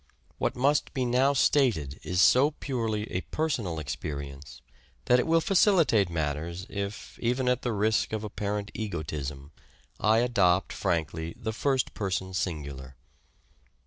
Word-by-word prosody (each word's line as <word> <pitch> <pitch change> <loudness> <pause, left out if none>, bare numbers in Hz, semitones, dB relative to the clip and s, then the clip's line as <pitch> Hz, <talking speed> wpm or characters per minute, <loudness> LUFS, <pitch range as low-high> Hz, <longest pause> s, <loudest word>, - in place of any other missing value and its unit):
What - - 0
must 140 +4 +1
be 130 -2 0
now 130 +3 +3
stated 115 - +2
is 90 0 0
so 135 +4 +6
purely 115 -8 -2
a 90 - -1
personal 115 - -2
experience, 70 -3 -6 0.4
that 125 - +5
it 125 - 0
will 165 0 +4
facilitate 165 - +4
matters 80 +3 -3
if, 100 +1 -5
even 125 +2 0
at 125 0 +2
the 120 - -1
risk 110 +1 +1
of 110 -1 -3
apparent 105 -1 -3
egotism, 75 -8 -5 0.5
I 110 +1 +4
adopt 100 -6 +2
frankly 80 0 -2
the 110 -2 -4
First 130 +2 0
Person 95 -2 -2
Singular. 70 -8 -4
105 Hz, 135 wpm, -28 LUFS, 80-125 Hz, 0.5 s, so